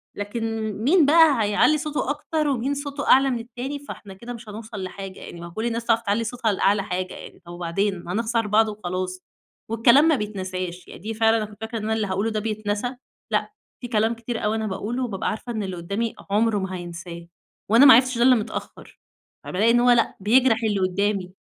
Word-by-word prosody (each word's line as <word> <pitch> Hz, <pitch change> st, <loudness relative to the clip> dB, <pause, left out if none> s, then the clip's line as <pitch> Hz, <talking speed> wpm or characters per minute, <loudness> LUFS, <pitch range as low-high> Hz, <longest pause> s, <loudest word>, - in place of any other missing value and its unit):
لكن 220 Hz, +1 st, -3 dB
مين 315 Hz, +5 st, +5 dB
بقى 300 Hz, -5 st, +5 dB
هيعلّي 210 Hz, +9 st, +3 dB
صوته 300 Hz, -3 st, -3 dB
أكتر 300 Hz, +1 st, -1 dB
ومين 270 Hz, 0 st, 0 dB
صوته 285 Hz, 0 st, -5 dB
أعلى 270 Hz, +1 st, +6 dB
من 245 Hz, -3 st, -1 dB
التاني 245 Hz, +5 st, -6 dB
فإحنا 215 Hz, -8 st, -10 dB
كده 235 Hz, +6 st, -8 dB
مش 235 Hz, -2 st, -11 dB
هنوصَل 215 Hz, -1 st, -7 dB
لحاجة 190 Hz, 0 st, -7 dB
يعني، 170 Hz, -, -10 dB
ما 170 Hz, -, -7 dB
هو -, -, -12 dB
كل 220 Hz, +6 st, -4 dB
الناس 230 Hz, 0 st, -2 dB
تعرف 230 Hz, -1 st, +3 dB
تعلّي 215 Hz, +1 st, 0 dB
صوتها 230 Hz, -1 st, -1 dB
لأعلى 200 Hz, +1 st, +2 dB
حاجة 185 Hz, -2 st, -3 dB
يعني. -, -, -11 dB
طَب 175 Hz, -, -10 dB
وبعدين 175 Hz, +2 st, -2 dB
هنخسَر 225 Hz, +4 st, -1 dB
بعض 220 Hz, +2 st, +4 dB
وخلاص 185 Hz, -2 st, -4 dB, 0.5 s
والكلام 235 Hz, +6 st, +5 dB
ما 320 Hz, -, +4 dB
بيتنساش 185 Hz, -5 st, -5 dB
يعني -, -, -11 dB
دي 220 Hz, +2 st, -4 dB
فعلًا 225 Hz, +1 st, +3 dB
أنا 215 Hz, -, -1 dB
كنت 210 Hz, 0 st, -14 dB
فاكرة 225 Hz, +1 st, -4 dB
إن 215 Hz, -, -5 dB
أنا 220 Hz, +1 st, 0 dB
اللي 220 Hz, -2 st, -1 dB
هاقوله 195 Hz, +4 st, -1 dB
ده 215 Hz, -, -1 dB
بيتنسى 215 Hz, +3 st, -3 dB, 0.4 s
لأ، -, -, 0 dB, 0.3 s
في 245 Hz, -, -5 dB
كلام 225 Hz, -1 st, +1 dB
كتير 230 Hz, 0 st, -5 dB
أوي 210 Hz, +1 st, +1 dB
أنا 220 Hz, -1 st, -2 dB
باقوله 215 Hz, +6 st, -3 dB
وبابقى 205 Hz, -6 st, -2 dB
عارفة 240 Hz, +3 st, -5 dB
إن 220 Hz, -2 st, -3 dB
اللي 190 Hz, -2 st, -4 dB
قدامي 200 Hz, +7 st, -3 dB
عُمره 215 Hz, +1 st, +2 dB
ما 190 Hz, -1 st, -4 dB
هينساه 170 Hz, -1 st, -8 dB, 0.4 s
وأنا 230 Hz, +6 st, +7 dB
ما 270 Hz, -, +11 dB
عرفتش 255 Hz, +1 st, +4 dB
ده 235 Hz, -, +3 dB
إلّا 255 Hz, 0 st, +6 dB
متأخر. 215 Hz, -3 st, -6 dB, 0.4 s
فبالاقي 210 Hz, +5 st, +2 dB
إن 240 Hz, -, +4 dB
هو 245 Hz, 0 st, +5 dB
لأ 240 Hz, -1 st, +2 dB
بيجرَح 230 Hz, +4 st, +4 dB
اللي 210 Hz, -3 st, +1 dB
قدامي. 190 Hz, 0 st, -1 dB
220 Hz, 210 wpm, -23 LUFS, 195-240 Hz, 0.5 s, ما